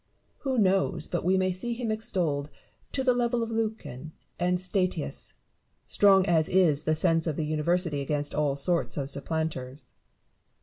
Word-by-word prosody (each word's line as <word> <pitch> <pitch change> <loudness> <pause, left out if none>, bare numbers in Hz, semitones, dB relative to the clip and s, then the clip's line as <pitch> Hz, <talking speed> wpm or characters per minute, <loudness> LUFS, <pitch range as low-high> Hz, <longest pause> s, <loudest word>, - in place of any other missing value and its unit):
Who 265 -2 -2
knows 190 -5 +2
but 175 - -2
wo 185 +3 +3
may 185 0 +1
see 235 +7 -4
him 235 -2 -2
extolled 170 -9 -1 0.4
to 265 - -1
the 255 -1 +4
level 240 -1 0
of 230 - -5
Lucan 215 - -4 0.3
and 180 0 +1
Statius, 185 0 -2 0.5
strong 195 -2 +4
as 160 -3 +2
is 160 -6 +3
the 155 - +2
sense 165 0 +2
of 155 - -1
the 155 - -2
University 155 0 +1
against 145 +1 -2
all 145 -2 +1
sorts 170 +4 0
of 140 -1 -2
supplanters 145 -2 -4
175 Hz, 160 wpm, -27 LUFS, 150-195 Hz, 0.5 s, the